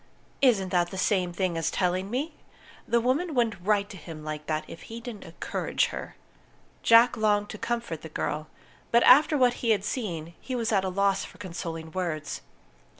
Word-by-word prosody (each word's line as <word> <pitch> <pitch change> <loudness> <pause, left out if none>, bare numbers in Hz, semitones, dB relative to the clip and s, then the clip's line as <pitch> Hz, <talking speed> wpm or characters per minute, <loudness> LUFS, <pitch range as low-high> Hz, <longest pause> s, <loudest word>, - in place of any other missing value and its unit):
Isn't 215 -9 +4
that 175 -1 +2
the 190 - -7
same 185 -2 +1
thing 175 -1 -1
as 165 0 0
telling 185 +1 0
me? 280 +7 -2 0.5
The 235 - +3
woman 280 +7 0
wouldn't 225 -6 +1
write 205 0 +2
to 195 - -9
him 160 -3 -9
like 150 0 -5
that 155 0 -1
if - - -10
he 230 +1 -6
didn't 230 -3 -8
encourage - - -1
her." - - -6 0.7
Jack 230 +1 +6
longed 210 -1 +2
to 215 - -7
comfort 235 -10 -3
the 160 - -8
girl; 155 0 -3 0.4
but 235 0 +5
after 295 +4 +7
what 250 -2 +4
he 235 - 0
had 205 -3 +3
seen, 170 -10 -3
he 260 - -4
was 230 -2 -1
at 195 -3 +3
a 190 - -1
loss 195 +1 +1
for - - -11
consoling 165 -3 -6
words. 165 -4 -3
195 Hz, 190 wpm, -27 LUFS, 170-235 Hz, 0.7 s, after